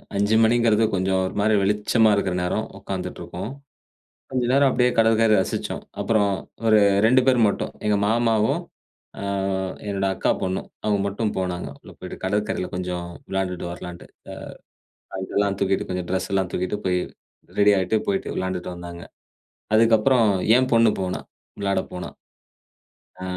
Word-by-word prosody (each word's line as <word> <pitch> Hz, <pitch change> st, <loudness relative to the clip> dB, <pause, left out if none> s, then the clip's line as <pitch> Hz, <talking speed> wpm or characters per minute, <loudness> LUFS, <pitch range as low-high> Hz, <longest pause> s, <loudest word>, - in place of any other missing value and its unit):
5 105 Hz, +2 st, +2 dB
மணிங்கிறது 115 Hz, -1 st, +3 dB
கொஞ்ச 95 Hz, 0 st, 0 dB
ஒரு 95 Hz, -, -3 dB
மாரி 110 Hz, +2 st, +3 dB
வெளிச்சமா 105 Hz, +3 st, +3 dB
இருக்கிற 100 Hz, -2 st, 0 dB
நேரம். 100 Hz, +5 st, -1 dB
உக்காந்துட்டு 95 Hz, -2 st, -5 dB
இருக்கோம். 90 Hz, +6 st, -6 dB, 0.8 s
கொஞ்ச 130 Hz, -2 st, 0 dB
நேரம் 140 Hz, +1 st, +5 dB
அப்டியே 125 Hz, -1 st, +3 dB
கடற்கரை 115 Hz, -1 st, +4 dB
ரசிச்சோம். -, -, -4 dB, 0.2 s
அப்புறம், 105 Hz, -3 st, +2 dB, 0.4 s
ஒரு 110 Hz, -1 st, +6 dB, 0.3 s
2 130 Hz, +3 st, +5 dB
பேர் 130 Hz, -2 st, +4 dB
மட்டும் 100 Hz, -, -3 dB
எங்க 105 Hz, -1 st, +3 dB
மாமாவும், 115 Hz, -1 st, +2 dB, 0.6 s
ஆ -, -, -6 dB, 0.7 s
என்னோட 100 Hz, -1 st, -1 dB
அக்கா -, -, 0 dB
பொண்ணும் 95 Hz, 0 st, -2 dB, 0.2 s
அவங்க 105 Hz, -2 st, +1 dB
மட்டும் 105 Hz, +2 st, -2 dB
போனாங்க. 90 Hz, -4 st, -3 dB
உள்ள -, -, -13 dB
போயிட்டு -, -, -8 dB
கடற்கரையில 100 Hz, -1 st, -1 dB
கொஞ்ச 90 Hz, 0 st, -3 dB, 0.4 s
வெளாண்டுட்டு 95 Hz, -2 st, -2 dB
வர்லான்ட்டு. 90 Hz, 0 st, -9 dB, 1.0 s
ஆ -, -, -12 dB
அங்கிட்டேல்லாம் 100 Hz, +1 st, -1 dB
தூக்கிட்டு 95 Hz, -1 st, 0 dB
கொஞ்சம் 90 Hz, -1 st, -3 dB
டிரெஸ் 95 Hz, 0 st, -1 dB
எல்லாம் 95 Hz, -2 st, 0 dB
தூக்கிட்டு 90 Hz, +3 st, -2 dB
போய், 90 Hz, -1 st, +2 dB, 0.6 s
ரெடி 105 Hz, 0 st, +6 dB
ஆயிட்டு 95 Hz, +4 st, +1 dB
போயிட்டு 195 Hz, -1 st, 0 dB
வெளாண்டுட்டு 95 Hz, -1 st, -3 dB
வந்தாங்க. 85 Hz, 0 st, -9 dB, 0.7 s
அதுக்கப்புறம் 115 Hz, +2 st, +4 dB, 0.3 s
என் 130 Hz, 0 st, +1 dB
பொண்ணு 115 Hz, -1 st, +5 dB
போனாள். 90 Hz, -1 st, -3 dB, 0.3 s
விளாடப் 100 Hz, -1 st, -1 dB
போனாள். 90 Hz, -1 st, -7 dB, 1.1 s
ஆ -, -, -5 dB
100 Hz, 140 wpm, -23 LUFS, 95-110 Hz, 1.1 s, ஒரு